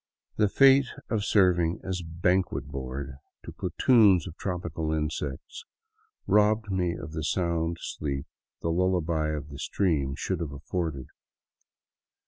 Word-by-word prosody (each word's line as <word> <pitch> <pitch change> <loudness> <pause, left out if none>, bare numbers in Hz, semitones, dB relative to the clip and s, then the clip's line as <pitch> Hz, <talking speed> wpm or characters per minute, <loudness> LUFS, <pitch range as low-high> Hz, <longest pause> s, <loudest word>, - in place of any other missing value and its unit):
The 105 -2 +3
fate 135 +2 +6 0.2
of 110 -3 0
serving 90 -5 +3
as 95 -1 -3
banquet 85 -3 0
board 70 0 -6 0.3
to - - -7
platoons 105 -8 +4
of 80 - -8
tropical 85 -4 -3
insects 75 -3 -3 0.6
robbed 105 +1 +3
me 90 -2 0
of 75 - -8
the 80 0 -4
sound 85 0 0
sleep 70 -2 -4 0.4
the 85 - 0
lullaby 85 -3 +1
of 75 -1 -4
the 70 0 -9
stream 75 -8 0
should 95 +3 -2
have 80 -4 -4
afforded. 75 -1 -3
85 Hz, 125 wpm, -27 LUFS, 75-95 Hz, 0.6 s, fate